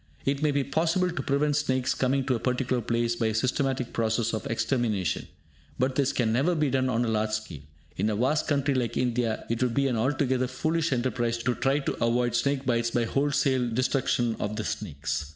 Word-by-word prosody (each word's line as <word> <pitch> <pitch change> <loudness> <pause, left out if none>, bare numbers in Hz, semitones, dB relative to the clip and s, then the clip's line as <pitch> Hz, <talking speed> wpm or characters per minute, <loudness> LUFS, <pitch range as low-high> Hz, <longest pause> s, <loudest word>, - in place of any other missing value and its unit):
It 140 +1 0
may 150 - +3
be 140 -1 +1
possible 165 +6 +1
to 175 - -3
prevent 145 +1 +1
snakes 130 -3 +1
coming 135 +1 0
to 130 - +1
a 120 - -1
particular 125 0 0
place 115 +1 0
by 115 -1 0
a 110 - 0
systematic 130 +1 0
process 115 0 0
of 110 - -3
extermination, 110 - -1 0.5
but 130 +1 +1
this 140 0 +1
can 115 -5 0
never 150 +9 +2
be 150 -4 +1
done 130 0 +1
on 120 0 +1
a - - -2
large 110 -1 0
scale. 110 -9 -4 0.4
In 110 - +1
a 105 - 0
vast 130 +8 +1
country 140 -1 +1
like 125 -3 -1
India, 120 -2 0
it 115 +1 -2
would 125 -2 +1
be 140 0 +2
an 125 -3 0
altogether 130 +1 +1
foolish 160 +5 -1
enterprise 120 -2 0
to 125 - +1
try 135 +3 +1
to 145 - -2
avoid 120 +1 +1
snake 140 +2 0
bites 115 -1 +1
by 120 0 0
wholesale 135 -1 +1
destruction 120 -1 +1
of 105 +1 -2
the 110 - -3
snakes. 75 - -3
125 Hz, 205 wpm, -27 LUFS, 115-140 Hz, 0.5 s, may